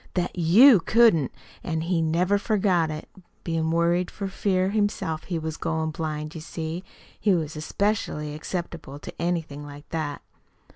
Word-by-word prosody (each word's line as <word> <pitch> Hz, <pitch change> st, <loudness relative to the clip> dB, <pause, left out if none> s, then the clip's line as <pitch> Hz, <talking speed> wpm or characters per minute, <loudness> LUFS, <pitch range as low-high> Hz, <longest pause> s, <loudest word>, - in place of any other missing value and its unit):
That 180 Hz, -1 st, -1 dB
YOU 195 Hz, -, +7 dB
couldn't. 195 Hz, -, +4 dB, 0.3 s
An' 160 Hz, -2 st, -2 dB
he 170 Hz, 0 st, 0 dB
never 175 Hz, +5 st, +2 dB
forgot 190 Hz, -6 st, +2 dB
it. 155 Hz, 0 st, -6 dB, 0.4 s
Bein' 165 Hz, -1 st, -1 dB
worried 170 Hz, +2 st, +2 dB
for 200 Hz, -, -5 dB
fear 190 Hz, -1 st, +1 dB
he -, -, -4 dB
himself 180 Hz, -7 st, -1 dB
was 160 Hz, -3 st, -3 dB
goin' 160 Hz, -1 st, -1 dB
blind, 155 Hz, -1 st, -4 dB
you 160 Hz, -, -7 dB
see, 165 Hz, +2 st, -5 dB, 0.4 s
he 200 Hz, -3 st, +3 dB
was 155 Hz, -2 st, -2 dB
especially 155 Hz, -2 st, -1 dB
acceptable 165 Hz, -2 st, -5 dB
to -, -, -9 dB
anything 165 Hz, -4 st, -2 dB
like 145 Hz, 0 st, -11 dB
that." 155 Hz, -3 st, -3 dB
165 Hz, 150 wpm, -25 LUFS, 155-185 Hz, 0.4 s, YOU